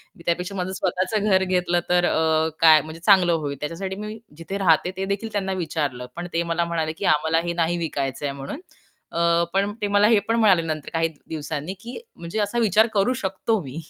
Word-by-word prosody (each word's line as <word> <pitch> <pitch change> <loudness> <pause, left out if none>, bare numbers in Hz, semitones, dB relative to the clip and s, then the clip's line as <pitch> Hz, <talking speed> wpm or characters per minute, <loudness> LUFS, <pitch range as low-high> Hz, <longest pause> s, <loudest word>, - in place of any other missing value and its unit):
मी 170 - -16
त्यापेक्षा 180 +3 -1
माझं 185 -1 -2
स्वतःचं 190 +3 -1
घर 190 -1 +4
घेतलं 180 -2 +1
तर 180 0 +3
अ, 160 -1 +2
काय 160 -2 +7
म्हणजे 155 +2 -9
चांगलं 185 -4 +5
होईल. 145 -3 -2
त्याच्यासाठी 175 +6 -4
मी 210 +2 -6 0.2
जिथे 170 +4 -5
राहते, 180 -2 +3
ते 190 - -2
देखील 200 +3 -3
त्यांना 195 -2 -1
विचारलं, 145 -6 -3
पण 175 +1 -5
ते 165 +1 +1
मला 170 0 +1
म्हणाले, 165 -2 -2
की 195 - -5
"आम्हाला 160 +2 +1
हे 170 - -1
नाही 170 0 0
विकायचं 145 -5 -3
आहे" 140 - -2
म्हणून. 140 - -7 0.5
अ, 170 0 +2
पण 200 +1 +1
ते 205 - 0
मला 205 +1 +5
हे 225 -2 +5
पण 225 - +2
म्हणाले 195 -6 +5
नंतर 155 -2 -4
काही 165 0 +2 0.2
दिवसांनी, 155 +2 -4
की 235 +5 -8 0.2
म्हणजे 170 +5 -5
"असा 210 +3 0
विचार 220 0 +4
करू 205 +4 +2
शकतो 195 +3 0
मी." 135 +1 -8
175 Hz, 205 wpm, -23 LUFS, 160-195 Hz, 0.5 s, काय